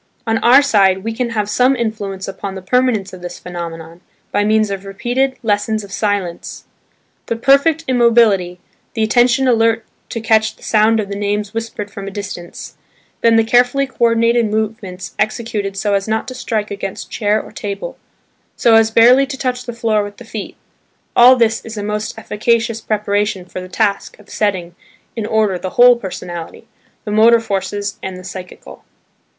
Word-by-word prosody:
On 225 -1 +1
our 260 +4 +6
side, 195 -7 +3
we 225 +1 -3
can 240 +1 -2
have 215 -3 -2
some 250 +5 +3
influence 210 -5 -4
upon 195 0 -6
the 190 - -8
permanence 220 -2 +1
of 185 - -10
this 175 0 -7
phenomenon, 170 -1 -8 0.3
by 205 - +1
means 215 0 +2
of 195 -1 -4
repeated 245 +7 -1
"Lessons 215 0 0
of 200 - -12
Silence." 200 -4 -3 0.6
The 230 - -1
perfect 280 +6 +3
immobility, 230 -8 +3 0.4
the 220 - +1
attention 240 +4 +3
alert 230 -1 +2 0.2
to 230 - -4
catch 220 -1 +2
the - - -20
sound 220 +1 +3
of 210 - -2
the 200 - -4
names 205 +1 -2
whispered 225 -2 -5
from 200 0 -8
a - - -3
distance, 195 -3 -8 0.4
then 230 -1 +4
the 225 - +5
carefully 245 +4 +3
co 265 - -20
ordinated 230 0 +3
movements 210 -3 -4
executed 215 -2 -2
so 205 +1 0
as 195 +1 0
not 220 0 -1
to - - -7
strike 220 -5 -3
against 195 -1 -6
chair 210 -1 +1
or - - -10
table, 205 - -6 0.6
so 235 - +3
as 225 0 +5
barely 245 +5 +5
to 270 -1 -6
touch 250 -1 -3
the - - -3
floor 225 -3 0
with 205 0 -8
the 245 - -12
feet–all 240 +3 +1
this 230 -2 +1
is 225 -1 -8
a 205 - -3
most 210 +1 -3
efficacious 225 +1 0
preparation 205 -2 -1
for 185 - -7
the 185 - -9
task 200 +1 -1
of 210 -1 -18
setting 185 -5 -1 0.4
in 220 -3 -3
order 215 -5 +1
the 185 - -4
whole 245 0 +8
personality, 175 -6 -7 0.4
the 210 - -4
motor 225 +2 +5
forces 205 -1 -3
and 190 -1 -5
the 185 - -11
psychical. 180 - -10
215 Hz, 175 wpm, -17 LUFS, 200-230 Hz, 0.6 s, whole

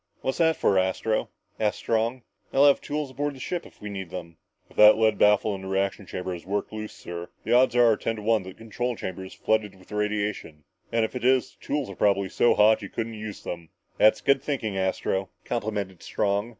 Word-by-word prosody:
"What's 130 - -2
that 160 -1 +4
for, 95 - +3
Astro?" 95 +4 0 0.3
asked 105 -1 +1
Strong. 115 +2 -1 0.3
"They'll 140 +1 +5
have 140 - +5
tools 145 -2 -3
aboard 145 +2 -2
the - - -12
ship 175 +6 -4
if - - -21
we 105 - -7
need 95 -3 -6
them." 85 -2 -8 0.3
"If - - -21
that 105 0 +8
lead 110 -1 +2
baffle 105 0 +4
in 95 - -6
the 95 - -7
reaction 95 0 -1
chamber 90 0 -4
has 85 - -7
worked 100 +2 -3
loose, 110 0 -5
sir, 85 0 -7
the 115 - 0
odds 125 0 +5
are 120 -2 +6
ten 115 - -2
to 105 - -8
one 110 0 +3
that 95 - -9
the 95 - -12
control 120 +2 -3
chamber 95 -2 -5
is 95 - -10
flooded 110 -3 0
with 95 -1 -19
radiation. 105 -7 -2 0.3
And 115 -1 +2
if 110 - -8
it 125 - -4
is, 130 0 +3
the - - -23
tools 145 -2 -1
are 100 - -8
probably 100 -1 +2
so 120 - +3
hot 110 +1 +5
you 100 - -7
couldn't 115 0 -4
use 105 -1 -7
them." 85 -2 -6 0.3
"That's 110 +1 +5
good 140 -1 +3
thinking, 130 -8 -2
Astro," 95 0 -1 0.2
complimented 105 -5 -3
Strong. 100 +2 -1
105 Hz, 225 wpm, -26 LUFS, 95-115 Hz, 0.3 s, that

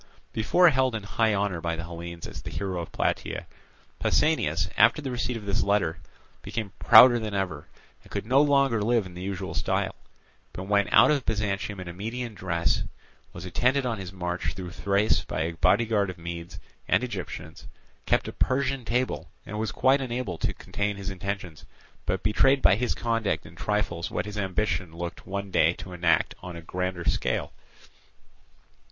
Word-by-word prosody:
Before 145 +11 +4
held 130 -3 +2
in 110 - -4
high 110 +1 +1
honour 100 -4 -1
by 85 0 -1
the 85 - -5
Hellenes 85 0 -7
as - - -8
the - - -7
hero 95 -3 -3
of 85 - -8
Plataea, - - -2 0.5
Pausanias, 85 - +2
after 115 +7 +5
the 140 -3 -4
receipt 125 0 -2
of 105 - -9
this 100 +2 0
letter, 90 -6 +1 0.4
became 110 -4 -4
prouder 120 +2 +8
than 110 -2 -4
ever, 90 -7 -3 0.3
and - - -19
could 100 0 -4
no 130 +5 +5
longer 140 -6 +3
live 115 0 +2
in 90 - -10
the 90 - -8
usual 95 0 -4
style, - - 0 0.6
but 90 - -6
went 100 +1 +2
out - - +7
of 145 -4 +1
Byzantium 105 -2 -2
in 90 - -7
a 85 - -6
Median 115 +5 -4
dress, 85 -3 0 0.5
was 85 +1 -8
attended 125 +9 +1
on 115 -4 -1
his 95 -1 -6
march 90 -3 -3
through 90 -2 -6
Thrace 100 +3 +1
by - - -3
a 80 +1 0
bodyguard 100 +4 +2
of 90 - -7
Medes 85 0 -7 0.3
and - - +3
Egyptians, 80 +1 -6 0.4
kept - - +2
a - - -5
Persian 135 0 0
table, 120 +3 -1 0.2
and 105 +1 -5
was 110 -3 -1
quite 135 +6 +3
unable 120 -9 -3
to - - 0
contain 105 0 -3
his 100 0 -5
intentions, 95 -3 -5 0.4
but 90 +1 -1
betrayed 135 +6 +3
by 90 - +7
his 120 +3 -1
conduct 115 -3 -1
in - - -12
trifles 100 -5 -1
what - - -2
his 105 0 -5
ambition 95 -4 -1
looked 85 0 -6
one 100 0 -4
day 80 -1 +4
to 90 +1 -9
enact 85 -2 +2
on 90 -1 -7
a 85 - -7
grander 90 +1 -3
scale. - - 0
100 Hz, 180 wpm, -27 LUFS, 90-115 Hz, 0.6 s, prouder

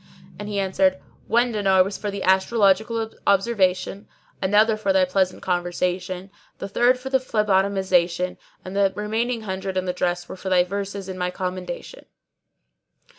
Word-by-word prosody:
and 205 0 -6
he 205 - -3
answered, 190 -1 +2 0.3
'One 240 +1 +2
dinar 195 -3 +3
was 195 +1 -5
for 210 - -4
the 200 -1 -4
astrological 220 +3 +2 0.2
observation, 195 -1 +1 0.3
another 210 +3 +4
for 215 -2 0
thy 190 -1 +4
pleasant 185 0 0
conversation, 180 +1 -2 0.3
the 195 - -5
third 240 +5 +3
for 265 +1 -7
the 265 - +4
phlebotomisation, 190 -6 +1 0.3
and 185 +1 -7
the 200 -1 +3
remaining 225 +3 -1
hundred 190 -2 -4
and 185 0 -1
the 180 - 0
dress 175 -1 -1
were - - -7
for 190 +1 -6
thy 180 -1 +4
verses 200 +1 -5
in 185 -1 -6
my 180 0 0
commendation.'" 180 -1 -6
190 Hz, 155 wpm, -23 LUFS, 185-210 Hz, 0.3 s, another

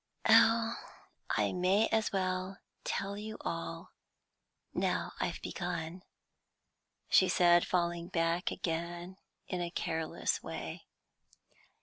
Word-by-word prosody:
"Oh, 230 0 +6 0.5
I - - +2
may 185 +4 +3
as 220 -1 +1
well 185 0 -1 0.3
tell 200 0 -2
you 215 +1 -6
all, 85 0 -4 0.8
now - - 0
I've - - -1
begun," 165 +3 -4 1.1
she 185 - +5
said, 175 -1 +5
falling 170 -1 0
back 165 0 +1
again 175 +2 -4 0.3
in 180 -2 -2
a 175 - -2
careless 160 -1 -1
way. - - -6
180 Hz, 100 wpm, -33 LUFS, 170-195 Hz, 1.1 s, Oh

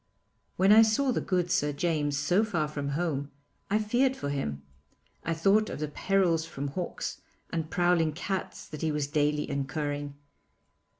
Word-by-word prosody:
When 190 +2 +5
I 220 +1 +9
saw 225 +5 +3
the - - 0
good 180 -2 0
Sir 145 0 +2
James 145 -1 0
so 175 +9 +2
far 170 -8 0
from 145 -2 -4
home, 145 -5 -1 0.4
I 205 - +3
feared 245 +5 +2
for 145 - -4
him. 75 - -3 0.6
I 165 - -1
thought 200 +6 +3
of - - -5
the 150 -1 -2
perils 175 -1 +1
from 145 -3 -5
hawks 175 +6 -4 0.3
and 160 -1 -2
prowling 175 -3 +2
cats 190 +3 -4
that 155 - -7
he 160 - +1
was 150 -1 0
daily 150 0 0
incurring. 145 +1 -3
160 Hz, 165 wpm, -29 LUFS, 145-190 Hz, 0.6 s, I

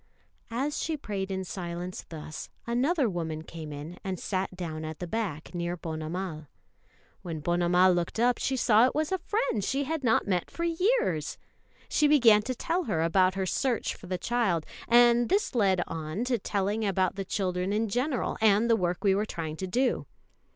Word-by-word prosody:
] - - -39 0.2
As 295 0 -2
she 320 -1 -1
prayed 200 -7 -4
in 190 -1 -2
silence 175 0 -5
thus, 155 -1 -7 0.2
another 260 +5 +2
woman 160 -5 -3
came 160 -2 -8
in 150 +4 -8
and 190 -3 -3
sat 190 -1 -2
down 160 -3 -4
at 155 0 -5
the 180 - -5
back 175 -6 -3
near 175 0 -2
Ponnamal. 160 0 -5 0.7
When 165 -3 -5
Ponnamal 175 +3 +3
looked 175 +4 -2
up, 245 +1 +3
she 265 - 0
saw 230 0 +5
it - - -4
was 310 +2 0
a 380 - +1
friend 340 - -1
she 275 +7 0
had 315 +1 -3
not 225 -3 +3
met 180 -3 0
for 335 - -5
years. 335 - +1 0.5
She 300 - +3
began 235 -8 +6
to 255 +4 -3
tell 340 +8 -1
her 165 -6 0
about 185 +2 +3
her 190 -1 -1
search 240 +5 0
for 185 - -12
the 185 0 -2
child; 190 -5 0 0.2
and 240 0 +5
this 400 -3 +1
led 195 -6 +3
on 160 +7 -4
to 250 -2 0
telling 205 +2 -1
about 190 -3 +1
the 195 - -4
children 185 -1 -1
in 220 +2 +1
general, 250 +5 -1
and 215 +1 +4
the - - +6
work 180 -3 -1
we 195 -2 +4
were 205 +2 0
trying 160 -5 -4
to 190 - -4
do. 250 +7 0
195 Hz, 190 wpm, -28 LUFS, 175-240 Hz, 0.7 s, began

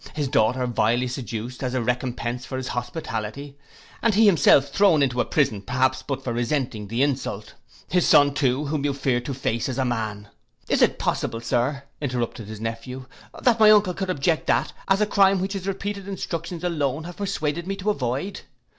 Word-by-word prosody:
His 150 -3 -1
daughter 125 +1 +2
vilely 120 +1 +1
seduced, 120 -1 -5
as 130 -1 -2
a 130 - +1
recompence 125 0 -2
for 130 - -5
his 130 -1 -4
hospitality, 120 +1 -4 0.5
and 230 -3 +2
he 220 +2 +6
himself 145 -7 +5
thrown 165 -1 +4
into 125 -2 +1
a - - -1
prison 115 -9 +1
perhaps 130 +5 0
but 135 0 -4
for 120 - -2
resenting 120 -3 -2
the 115 +6 0
insult? 130 -7 -2 0.3
His 180 -1 +2
son 145 -1 +6
too, 135 +1 +1
whom 145 0 -2
you 145 -2 0
feared 130 -3 0
to 140 - -3
face 115 -2 -1
as 130 - -3
a 130 - +1
man—' 110 -4 -3 0.4
'Is - - +1
it - - +4
possible, 115 - -1
Sir,' 125 +4 -1 0.2
interrupted 120 -5 -3
his 110 -1 -8
nephew, 115 +3 -5 0.4
'that 235 -2 +4
my 215 -1 +8
uncle 205 -3 +5
could 190 +1 -4
object 160 -1 0
that - - +1
as 195 +1 +3
a - - +5
crime 195 -2 +4
which 190 +2 -2
his 195 -1 -5
repeated 200 0 -4
instructions 170 -3 -5
alone 150 -4 -1
have 175 +1 -9
persuaded 170 -4 -2
me 195 - -2
to 200 +2 0
avoid. 140 - -3
135 Hz, 190 wpm, -24 LUFS, 120-170 Hz, 0.5 s, my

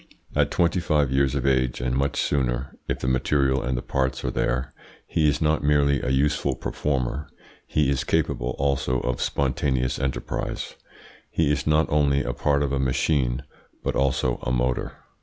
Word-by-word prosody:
At - - +3
twenty 85 +1 +2
five 75 -5 +1
years 70 0 +2
of 70 -2 -1
age, 65 -2 +2
and 60 0 -1
much 70 +1 0
sooner 65 -1 -1
if - - -1
the - - -4
material 65 +1 +2
and 65 +1 -1
the - - -4
parts 65 0 -1
are - - 0
there, 65 +2 -1 0.3
he 75 -2 +2
is 75 +2 0
not 75 -1 +2
merely 70 -1 +3
a - - -2
useful 70 0 +1
performer, 70 +1 -2 0.4
he 75 -2 +2
is 70 0 0
capable 70 -6 0
also 70 -2 +1
of 60 -1 -2
spontaneous 65 -2 0
enterprise; 65 -1 -3 0.6
he 80 -3 +1
is 75 - -1
not 75 +1 +4
only 70 -2 +3
a 60 - -2
part 70 +3 +1
of 70 - -1
a 70 - +1
machine, 65 -1 +1 0.4
but - - -1
also 65 -2 +1
a 65 - -2
motor. 60 0 0
70 Hz, 175 wpm, -25 LUFS, 65-75 Hz, 0.6 s, not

